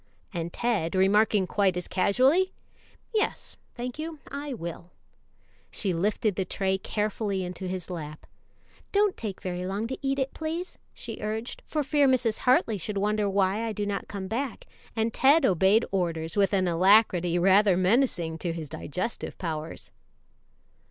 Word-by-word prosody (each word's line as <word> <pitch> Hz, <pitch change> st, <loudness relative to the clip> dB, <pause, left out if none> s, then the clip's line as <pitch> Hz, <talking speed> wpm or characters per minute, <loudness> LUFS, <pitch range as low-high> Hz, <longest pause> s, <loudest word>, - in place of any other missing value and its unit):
and 170 Hz, -1 st, -3 dB
Ted 205 Hz, -8 st, -1 dB
remarking 200 Hz, +1 st, +4 dB
quite 190 Hz, -1 st, +1 dB
as 180 Hz, -, -4 dB
casually, 265 Hz, -, +3 dB, 0.6 s
"Yes, 430 Hz, -1 st, -1 dB, 0.2 s
thank 245 Hz, +3 st, -5 dB
you, 320 Hz, 0 st, -5 dB
I 285 Hz, +1 st, -5 dB
will," 170 Hz, -6 st, -6 dB, 0.8 s
she 195 Hz, -4 st, -1 dB
lifted 205 Hz, +5 st, 0 dB
the 190 Hz, -, 0 dB
tray 190 Hz, +1 st, -1 dB
carefully 210 Hz, -2 st, -2 dB
into 180 Hz, +1 st, -6 dB
his 180 Hz, -2 st, -4 dB
lap. 155 Hz, -3 st, -7 dB, 0.7 s
"Don't 410 Hz, -1 st, +3 dB
take 205 Hz, -4 st, -6 dB
very 180 Hz, -1 st, -3 dB
long 195 Hz, +4 st, -2 dB
to 260 Hz, +3 st, -5 dB
eat 275 Hz, -1 st, 0 dB
it, 270 Hz, -1 st, -1 dB
please," 325 Hz, +3 st, -4 dB, 0.2 s
she 225 Hz, -2 st, -7 dB
urged, 220 Hz, +3 st, -4 dB
"for 305 Hz, -1 st, -1 dB
fear 285 Hz, 0 st, +3 dB
Mrs. 245 Hz, -4 st, +2 dB
Hartley 235 Hz, -4 st, +3 dB
should 200 Hz, +4 st, -4 dB
wonder 210 Hz, 0 st, +1 dB
why 195 Hz, +2 st, +1 dB
I 225 Hz, -1 st, -2 dB
do 205 Hz, 0 st, -2 dB
not 205 Hz, -1 st, -3 dB
come 195 Hz, -2 st, -5 dB
hack 245 Hz, +5 st, -3 dB, 0.3 s
and 225 Hz, 0 st, 0 dB
Ted 280 Hz, +3 st, +5 dB
obeyed 190 Hz, +4 st, +4 dB
orders 165 Hz, -4 st, -1 dB
with 200 Hz, -1 st, +3 dB
an 190 Hz, -2 st, +2 dB
alacrity 180 Hz, -1 st, +4 dB
rather 190 Hz, +1 st, +5 dB
menacing 185 Hz, -5 st, +1 dB
to 170 Hz, -2 st, -2 dB
his 160 Hz, -3 st, -6 dB
digestive 185 Hz, +13 st, -4 dB
powers. 160 Hz, -2 st, -5 dB
205 Hz, 155 wpm, -27 LUFS, 180-240 Hz, 0.8 s, Ted